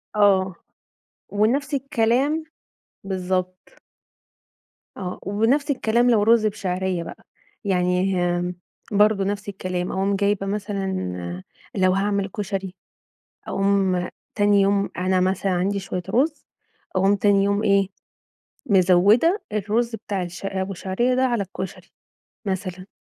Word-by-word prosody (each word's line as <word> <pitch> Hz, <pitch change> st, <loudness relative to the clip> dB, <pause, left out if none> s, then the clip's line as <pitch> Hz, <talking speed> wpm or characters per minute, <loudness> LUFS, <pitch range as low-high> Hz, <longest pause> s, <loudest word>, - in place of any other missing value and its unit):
آه، 190 Hz, -3 st, +3 dB, 0.7 s
ونفْس 260 Hz, +8 st, +1 dB
الكلام 270 Hz, +4 st, +1 dB, 0.6 s
بالضبط. 185 Hz, -1 st, -3 dB, 1.2 s
آه 180 Hz, -2 st, -5 dB
ونفْس 230 Hz, -, +1 dB
الكلام 240 Hz, -1 st, +2 dB
لو 210 Hz, -3 st, +4 dB
رز 225 Hz, 0 st, +4 dB
بشعرية 190 Hz, -4 st, -1 dB
بقى، -, -, -10 dB, 0.4 s
يعني 185 Hz, 0 st, +1 dB, 0.2 s
آمم، 175 Hz, 0 st, -3 dB, 0.4 s
برضه 205 Hz, -1 st, +4 dB
نفْس 205 Hz, +1 st, -3 dB
الكلام، 185 Hz, -2 st, -3 dB
أقوم 195 Hz, +1 st, 0 dB
جايبة 200 Hz, 0 st, +1 dB
مثلًا 190 Hz, -, -3 dB, 0.3 s
لو 185 Hz, -2 st, +3 dB
هاعمل 200 Hz, 0 st, 0 dB
كُشري، 195 Hz, -1 st, -4 dB, 0.7 s
أقوم 195 Hz, -2 st, +1 dB, 0.3 s
تاني 205 Hz, -1 st, +4 dB
يوم 200 Hz, 0 st, +2 dB
أنا 185 Hz, 0 st, +1 dB
مثلًا 190 Hz, +1 st, +1 dB
عندي 190 Hz, +3 st, 0 dB
شوية 185 Hz, -1 st, -4 dB
رز، 280 Hz, +5 st, 0 dB, 0.5 s
أقوم 195 Hz, +2 st, +4 dB
تاني 200 Hz, 0 st, +3 dB
يوم 200 Hz, +1 st, +1 dB
إيه، 195 Hz, -1 st, +3 dB, 0.8 s
مزوِّدة 200 Hz, -, +4 dB
الرز 220 Hz, +3 st, 0 dB
بتاع 200 Hz, -3 st, -3 dB
الش 175 Hz, +2 st, -7 dB
أبو 190 Hz, 0 st, -2 dB
شعرية 220 Hz, +8 st, 0 dB
ده 260 Hz, -, +3 dB
على 240 Hz, -5 st, +1 dB
الكُشري 190 Hz, 0 st, -7 dB, 0.6 s
مثلًا 185 Hz, -1 st, -4 dB
195 Hz, 115 wpm, -23 LUFS, 185-210 Hz, 1.2 s, لو